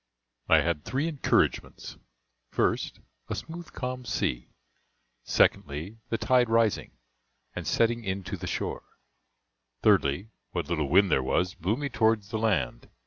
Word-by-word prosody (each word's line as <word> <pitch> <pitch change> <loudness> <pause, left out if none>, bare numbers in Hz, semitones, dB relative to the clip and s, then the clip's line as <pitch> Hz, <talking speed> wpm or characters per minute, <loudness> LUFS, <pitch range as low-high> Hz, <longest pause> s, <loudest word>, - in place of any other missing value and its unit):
I - - +7
had 80 -3 -1
three 140 +5 -1
encouragements 150 -5 0 0.6
1st, - - 0 0.3
a - - -1
smooth 170 +1 -8
calm 125 -1 -4
sea; 60 - -2 0.8
2ndly, 80 +10 +1
the 115 - 0
tide 125 -1 +3
rising, 115 - +2 0.6
and - - -5
setting 115 0 +2
in 95 -1 -3
to 95 +2 -4
the 90 - -6
shore; - - -3 1.0
3dly, 75 +10 +3 0.2
what - - -2
little 75 -5 0
wind 95 +3 +5
there 65 - +4
was 90 +7 0
blew 95 +7 -1
me 145 0 -2
towards 110 -5 +1
the 110 -1 -2
land. 85 - 0
105 Hz, 140 wpm, -28 LUFS, 85-120 Hz, 1.0 s, I